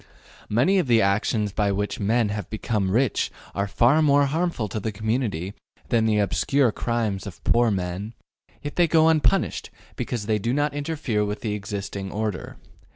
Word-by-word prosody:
Many 130 - +3
of 170 - 0
the 115 -2 +5
actions 105 +1 +1
by 100 0 0
which 105 +1 -2
men 110 +2 +1
have 105 -3 -4
become 105 -3 -1
rich 120 +4 +1 0.2
are 100 0 -1
far 125 +9 +3
more 145 -1 +4
harmful 160 -5 -1
to 110 - -3
the 110 +2 -3
community 105 -4 -2 0.4
than 115 -1 +2
the 110 -1 +2
obscure 105 +7 +2
crimes 110 -4 -2
of 90 - -10
poor 120 0 +3
men, 95 +3 -3 0.5
yet 145 - -6
they 175 -1 +5
go 160 0 +4
unpunished 155 -2 +1 0.3
because 115 -4 -3
they 105 0 +1
do 115 +5 -1
not 145 -1 0
interfere 145 -7 -1
with 105 0 -3
the 110 -2 -2
existing 100 -1 -5
order. 105 -2 -4
110 Hz, 170 wpm, -24 LUFS, 100-130 Hz, 0.5 s, the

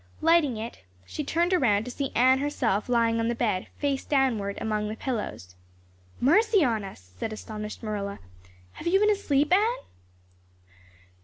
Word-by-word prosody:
Lighting 320 -7 +3
it, 225 +2 -6 0.3
she 300 - -5
turned 340 +5 +1
around 220 - +3
to 250 - -5
see 275 +1 -3
Anne 260 +2 +5
herself 245 -7 -1
lying 230 -1 +2
on 230 - 0
the 235 - 0
bed, 215 -6 -1
face 280 -2 -1
downward 235 -8 0
among 215 -1 -1
the 215 - -4
pillows. 215 - -4 0.7
"Mercy 405 - +4
on 225 -6 0
us," 90 - -11
said 220 - -3
astonished 215 0 -7
Marilla, 200 -2 -3 0.5
"have 340 - -8
you 380 +3 +4
been 420 +1 +4
asleep, 300 -6 +1
Anne?" 445 +6 +2
245 Hz, 155 wpm, -27 LUFS, 215-300 Hz, 0.7 s, Anne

